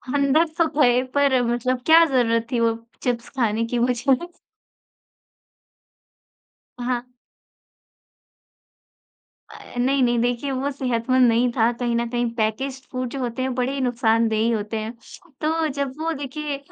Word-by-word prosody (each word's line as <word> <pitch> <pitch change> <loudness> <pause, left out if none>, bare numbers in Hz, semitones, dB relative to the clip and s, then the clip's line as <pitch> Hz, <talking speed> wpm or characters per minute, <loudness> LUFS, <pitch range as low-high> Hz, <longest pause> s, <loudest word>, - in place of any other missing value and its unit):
अंदर 285 +3 +3
तो 335 -2 +3
थए 250 -4 +4 0.2
पर 275 -3 +3
मतलब 250 +1 -1
क्या 325 +1 +7
जरूरत 230 -5 +1
थी 245 - +1
वो 230 -1 +2 0.3
चिप्स 240 -1 -2
खाने 230 -2 +1
की 240 - +1
मुझे? 250 +2 +2 2.6
हाँ। 245 0 -3 2.4
अ, - - -13
नहीं, 265 +3 +2
नहीं। 240 -1 +2
देखिए 245 +3 -1
वो 270 +2 -1
सेहतमंद 255 -1 +1
नहीं 240 +2 +2
था। 230 0 +4
कहीं 240 -1 0
न 235 0 0
कहीं 240 0 -1
पैकेज्ड 255 +4 -2
फूड 255 -1 -3
जो 275 - -6
होते 245 0 -3
हैं 260 0 -1
बड़े 250 +1 -1
ही 275 - -3
नुकसानदेही 230 -2 +1
होते 215 0 -2
हैं। 215 +1 -4 0.5
तो 320 +1 +1
जब 280 -2 -3
वो 325 +1 -1
देखिए 290 +1 -4
250 Hz, 140 wpm, -23 LUFS, 235-270 Hz, 2.6 s, क्या